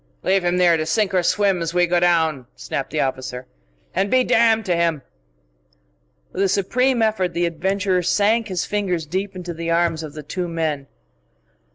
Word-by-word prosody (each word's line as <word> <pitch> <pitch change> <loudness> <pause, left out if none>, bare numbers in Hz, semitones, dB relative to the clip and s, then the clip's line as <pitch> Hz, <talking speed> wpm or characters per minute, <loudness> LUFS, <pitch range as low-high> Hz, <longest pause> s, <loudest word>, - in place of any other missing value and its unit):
"Leave 190 -1 +2
him 175 +1 +1
here 175 -2 +4
to 155 - -1
sink 200 +3 +1
or 185 - +3
swim 195 0 +1
as 165 +1 -3
we 175 0 +4
go 175 0 +1
down," 160 -7 +1
snapped 135 - -4
the 155 - -3
officer 130 -2 -3 0.5
"and 195 +2 0
be 255 +2 +3
damned 225 -2 +3
to 180 -3 +1
him!" 165 -4 0 1.3
With 185 - -3
a 195 - +2
supreme 240 +6 +1
effort 200 -5 0
the 175 0 +1
adventurer 185 +2 0
sank 215 +5 +2
his 185 -4 -2
fingers 185 -6 -2
deep 190 +5 -3
into 180 -1 -6
the 165 0 -5
arms 165 -1 +1
of 155 -2 -8
the 150 - -8
two 180 +5 -4
men. 155 -4 -2
175 Hz, 185 wpm, -21 LUFS, 165-195 Hz, 1.3 s, here